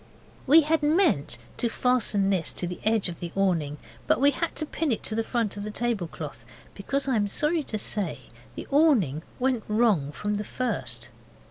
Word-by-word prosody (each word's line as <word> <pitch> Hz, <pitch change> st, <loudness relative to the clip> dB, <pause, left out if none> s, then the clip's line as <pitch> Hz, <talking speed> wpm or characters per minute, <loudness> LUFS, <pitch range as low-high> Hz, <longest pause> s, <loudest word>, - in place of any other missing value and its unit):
We 315 Hz, +4 st, +8 dB
had 315 Hz, +1 st, +1 dB
meant 295 Hz, -, +2 dB, 0.2 s
to 235 Hz, -, 0 dB
fasten 225 Hz, -5 st, +2 dB
this 185 Hz, -4 st, +1 dB
to -, -, -2 dB
the 180 Hz, 0 st, -5 dB
edge 220 Hz, -2 st, +2 dB
of 170 Hz, -2 st, -7 dB
the 170 Hz, -1 st, -5 dB
awning, 170 Hz, -7 st, +1 dB, 0.3 s
but -, -, +3 dB
we 285 Hz, +2 st, +5 dB
had 330 Hz, +4 st, -2 dB
to 310 Hz, -, -2 dB
pin 310 Hz, -1 st, -2 dB
it 225 Hz, -, -1 dB
to -, -, -2 dB
the 225 Hz, +1 st, 0 dB
front 225 Hz, -3 st, -1 dB
of 205 Hz, -, -4 dB
the 210 Hz, -, -4 dB
tablecloth, 175 Hz, -, -3 dB, 0.3 s
because 275 Hz, +8 st, -2 dB
I 265 Hz, -, +2 dB
am 205 Hz, -1 st, +1 dB
sorry 305 Hz, -, 0 dB
to 225 Hz, -6 st, -4 dB
say 205 Hz, -2 st, -3 dB, 0.3 s
the -, -, -6 dB
awning 255 Hz, -, +3 dB, 0.2 s
went 250 Hz, -3 st, 0 dB
wrong 210 Hz, -10 st, +2 dB
from 210 Hz, +6 st, -2 dB
the 210 Hz, -, -3 dB
first. 130 Hz, -, -3 dB
215 Hz, 195 wpm, -26 LUFS, 180-265 Hz, 0.3 s, We